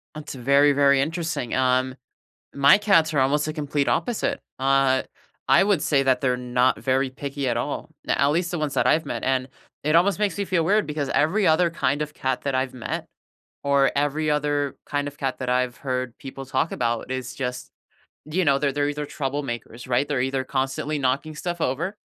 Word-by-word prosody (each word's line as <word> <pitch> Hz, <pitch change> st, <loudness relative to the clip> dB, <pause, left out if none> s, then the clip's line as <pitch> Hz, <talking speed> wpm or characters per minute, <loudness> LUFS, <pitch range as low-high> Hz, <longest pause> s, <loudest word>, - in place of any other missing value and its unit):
That's 155 Hz, -2 st, -7 dB
very, 140 Hz, +3 st, +4 dB
very 140 Hz, -1 st, +4 dB
interesting, 160 Hz, -4 st, -2 dB
um, 130 Hz, 0 st, +1 dB, 0.6 s
my 140 Hz, +5 st, +6 dB
cats 190 Hz, -7 st, +3 dB
are 145 Hz, -, +2 dB
almost 140 Hz, +3 st, +2 dB
the 155 Hz, -, -3 dB
complete 145 Hz, -2 st, -1 dB
opposite, 240 Hz, -3 st, 0 dB, 0.2 s
uh, 135 Hz, 0 st, +3 dB, 0.5 s
I -, -, +6 dB
would 195 Hz, -6 st, +2 dB
say 140 Hz, -2 st, +2 dB
that 130 Hz, -2 st, +2 dB
they're 125 Hz, -1 st, +1 dB
not 125 Hz, +1 st, +1 dB
very 135 Hz, 0 st, +1 dB
picky 140 Hz, +1 st, -4 dB
at 120 Hz, -, +1 dB
all, 140 Hz, +7 st, -3 dB, 0.2 s
n -, -, +2 dB
at 140 Hz, -, +3 dB
least 170 Hz, +3 st, 0 dB
the 175 Hz, -, -2 dB
ones 150 Hz, -2 st, -2 dB
that -, -, +2 dB
I've 160 Hz, -, +3 dB
met, 115 Hz, -, -4 dB
and 130 Hz, -1 st, 0 dB, 0.4 s
it 155 Hz, +2 st, +2 dB
almost 190 Hz, +4 st, +3 dB
makes 205 Hz, -3 st, 0 dB
me 200 Hz, -, 0 dB
feel 170 Hz, -3 st, +1 dB
weird 205 Hz, +4 st, +3 dB
because 150 Hz, -2 st, -2 dB
every 185 Hz, +7 st, +2 dB
other 165 Hz, +2 st, +4 dB
kind 145 Hz, -3 st, -1 dB
of 150 Hz, 0 st, -4 dB
cat 130 Hz, -4 st, -2 dB
that 140 Hz, -2 st, -1 dB
I've 130 Hz, 0 st, -1 dB
met, 125 Hz, -3 st, -5 dB, 0.6 s
or 140 Hz, -1 st, +3 dB
every 145 Hz, +2 st, 0 dB
other 145 Hz, -1 st, 0 dB
kind 145 Hz, -1 st, -2 dB
of 140 Hz, 0 st, -12 dB
cat 135 Hz, -1 st, -2 dB
that 130 Hz, -, -4 dB
I've 125 Hz, +1 st, 0 dB
heard 130 Hz, -3 st, -3 dB
people 135 Hz, 0 st, -8 dB
talk 135 Hz, +4 st, 0 dB
about 120 Hz, 0 st, -2 dB
is 130 Hz, -1 st, -4 dB
just, 125 Hz, -2 st, -4 dB, 0.6 s
you 175 Hz, +5 st, 0 dB
know, 140 Hz, -3 st, +3 dB
they're 140 Hz, -1 st, 0 dB
they're 145 Hz, +1 st, 0 dB
either 150 Hz, 0 st, -4 dB
troublemakers, 135 Hz, -5 st, -5 dB
right? 125 Hz, +3 st, +2 dB
They're 145 Hz, -3 st, -1 dB
either 130 Hz, +1 st, -1 dB
constantly 135 Hz, +3 st, -2 dB
knocking 140 Hz, +4 st, -1 dB
stuff 175 Hz, +2 st, -4 dB
over 170 Hz, +11 st, -1 dB
140 Hz, 200 wpm, -24 LUFS, 130-155 Hz, 0.6 s, my